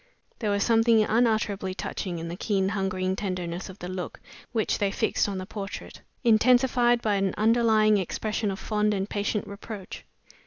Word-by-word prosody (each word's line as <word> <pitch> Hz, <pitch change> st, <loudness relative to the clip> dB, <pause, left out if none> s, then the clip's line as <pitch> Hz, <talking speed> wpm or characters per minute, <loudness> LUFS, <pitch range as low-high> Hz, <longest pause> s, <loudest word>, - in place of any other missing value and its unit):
There 215 Hz, -, -1 dB
was 200 Hz, 0 st, +1 dB
something 225 Hz, -1 st, +4 dB
unutterably 215 Hz, -4 st, +1 dB
touching 185 Hz, -2 st, -4 dB
in 165 Hz, 0 st, -5 dB
the 170 Hz, -, -5 dB
keen 195 Hz, -1 st, 0 dB
hungering 190 Hz, -2 st, -1 dB
tenderness 180 Hz, -3 st, -4 dB
of 190 Hz, -, -10 dB
the 180 Hz, -, -7 dB
look 185 Hz, -2 st, -5 dB, 0.3 s
which 225 Hz, -3 st, 0 dB
they 200 Hz, -, +2 dB
fixed 210 Hz, 0 st, 0 dB
on 195 Hz, -, -3 dB
the 185 Hz, -, -5 dB
portrait, 200 Hz, 0 st, -7 dB, 0.2 s
intensified 240 Hz, +1 st, +4 dB
by 210 Hz, -2 st, +2 dB
an 195 Hz, -1 st, 0 dB
underlying 215 Hz, -1 st, +4 dB
expression 210 Hz, +3 st, -2 dB
of 195 Hz, -, -3 dB
fond 210 Hz, 0 st, 0 dB
and 195 Hz, 0 st, -2 dB
patient 205 Hz, 0 st, -2 dB
reproach. 200 Hz, -1 st, -8 dB
205 Hz, 165 wpm, -26 LUFS, 190-220 Hz, 0.3 s, something